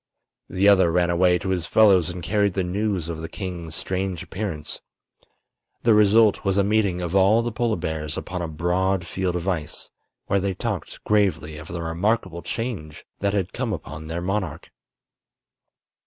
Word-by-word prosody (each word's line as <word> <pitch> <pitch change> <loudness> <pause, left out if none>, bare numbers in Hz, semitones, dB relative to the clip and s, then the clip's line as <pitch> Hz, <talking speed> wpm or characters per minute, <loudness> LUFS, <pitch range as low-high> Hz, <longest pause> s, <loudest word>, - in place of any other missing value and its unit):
The 95 +2 +2
other 95 -4 +6
ran 85 0 +2
away 90 +1 +4
to 95 +2 -4
his 90 -3 -1
fellows 95 -6 +5
and 90 0 -6
carried 100 0 +1
the 95 - +1
news 95 -1 -1
of 80 -1 -5
the 80 - -6
king's 85 -5 -6
strange 95 -1 -3
appearance. 90 -7 -5 1.0
The 115 - +5
result 105 +1 +5
was 95 -1 +1
a 100 - +4
meeting 100 -3 +1
of 90 +1 -3
all 100 +4 +5
the 120 - -2
polar 115 0 0
bears 80 -3 -4
upon 90 -1 -4
a 85 - -2
broad 90 +3 0
field 90 0 -2
of 90 +1 -3
ice, 80 -6 -3 0.3
where 100 - +1
they 95 0 -1
talked 105 -3 -4
gravely 90 -7 +1
of 80 - -10
the 85 0 -5
remarkable 85 +1 -1
change 100 - -5
that 100 0 0
had 95 -2 -1
come - - -2
upon 75 +2 -7
their 85 +2 -3
monarch. 90 -4 -3
95 Hz, 170 wpm, -24 LUFS, 85-100 Hz, 1.0 s, other